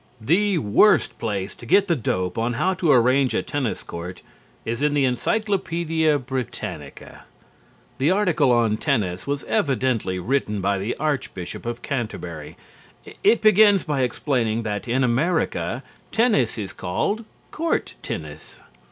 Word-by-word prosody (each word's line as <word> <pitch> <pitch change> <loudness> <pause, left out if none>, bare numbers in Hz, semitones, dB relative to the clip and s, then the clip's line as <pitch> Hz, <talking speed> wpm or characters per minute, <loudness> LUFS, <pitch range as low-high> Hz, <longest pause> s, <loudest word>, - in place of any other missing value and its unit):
The 185 - +2
worst 155 - +3
place 100 -4 -3
to - - -16
get 195 - +4
the 170 - +2
dope 90 - -2
on 115 +2 -1
how 185 +10 +1
to 170 -4 +1
arrange 130 +1 +4
a - - 0
tennis 140 -6 -3
court 90 +2 -8 0.4
is 115 +2 -3
in 145 0 +2
the 140 -2 +3
Encyclopædia 165 - 0
Britannica. 130 -3 -6 0.7
The 140 +4 +3
article 175 -8 +3
on 115 -3 +2
TENNIS 105 - -1
was 140 0 -2
evidently 125 -8 0
written 105 +1 -1
by 100 +1 0
the 100 +5 -2
Archbishop 130 - -3
of 120 0 -4
Canterbury. 100 - -5 0.7
It 235 - +4
begins 210 -2 +6
by 145 -4 -1
explaining 120 -3 0
that 105 +1 -4
in 130 +3 +1
America 130 -1 0 0.3
tennis 220 - +2
is 100 -3 -5
called 205 - -2 0.3
"court 330 +1 -1
tennis." - - -7
130 Hz, 135 wpm, -23 LUFS, 110-160 Hz, 0.7 s, begins